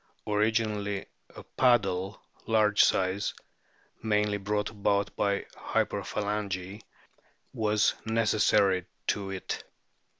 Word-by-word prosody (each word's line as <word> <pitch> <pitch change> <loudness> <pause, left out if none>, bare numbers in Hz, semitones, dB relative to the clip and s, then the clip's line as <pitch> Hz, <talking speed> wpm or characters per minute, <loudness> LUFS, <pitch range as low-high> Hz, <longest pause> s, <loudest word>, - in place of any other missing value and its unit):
Originally 105 -1 0 0.3
a - - -9
paddle, 100 -6 +1 0.3
large 105 -2 +4
size 95 +2 +1 0.7
mainly 105 -2 +1
brought 105 +1 -2
about 100 -1 0
by 100 -1 0
hyperphalangy 100 -1 -2 0.7
was 110 -3 +2
necessary 105 -4 +2 0.2
to 100 -1 -1
it. 95 -1 -4
105 Hz, 80 wpm, -29 LUFS, 100-110 Hz, 0.7 s, large